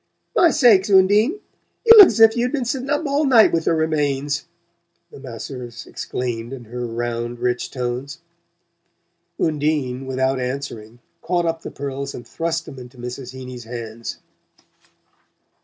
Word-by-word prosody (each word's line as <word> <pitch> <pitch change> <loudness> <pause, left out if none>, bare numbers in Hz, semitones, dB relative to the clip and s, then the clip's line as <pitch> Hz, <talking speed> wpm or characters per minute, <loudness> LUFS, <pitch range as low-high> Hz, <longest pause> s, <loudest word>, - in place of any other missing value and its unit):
"My 345 - +5
sakes. 235 -10 +4
Undine! 205 - +4 0.5
You 460 - +10
look's 395 - +9
if 225 0 +7
you'd 245 +1 0
been 270 -4 -2
setting 260 +2 -3
up 295 +2 0
all 285 +1 +1
night 245 -6 +6
with 165 -1 -1
a - - +4
remains!" 145 -2 -1 0.7
the - - -12
masseuse 120 -2 -8
exclaimed 120 -1 -5
in 130 -3 -8
her 120 +2 -6
round 120 +1 -4
rich 125 0 -1
tones. 125 +2 -4 1.2
Undine, 145 -4 -1
without 130 0 0
answering, 125 -3 -6 0.2
caught 175 -1 0
up 165 0 -2
the - - -7
pearls 140 0 -5
and 120 - -10
thrust 165 0 -3
them 135 - -10
into 125 0 -12
Mrs. 125 +1 -7
Heeny's 125 -2 -9
hands. 115 -1 -7
135 Hz, 140 wpm, -21 LUFS, 125-185 Hz, 1.2 s, You